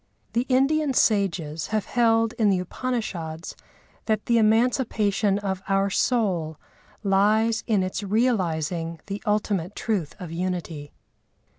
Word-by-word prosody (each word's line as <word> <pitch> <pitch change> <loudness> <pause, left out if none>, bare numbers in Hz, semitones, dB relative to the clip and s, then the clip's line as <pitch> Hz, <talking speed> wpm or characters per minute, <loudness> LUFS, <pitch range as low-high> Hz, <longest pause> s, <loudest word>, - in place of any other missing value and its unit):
The 240 +3 0
Indian 275 +2 +2
sages 170 -9 +1
have 215 -1 -1
held 225 -2 +2
in 215 -2 +4
the 195 - +3
Upanishads 180 -6 -4 0.5
that 215 -1 0
the 235 -1 +3
emancipation 215 -3 +2
of 190 -2 -3
our 195 0 +2
soul 185 - 0 0.5
lies 215 +3 +2
in 210 -5 +2
its 185 +3 -3
realising 175 -7 0
the 200 +1 -5
ultimate 205 -3 0
truth 195 -9 -2
of 180 -4 -7
unity. 170 -4 -4
205 Hz, 120 wpm, -25 LUFS, 180-225 Hz, 0.5 s, in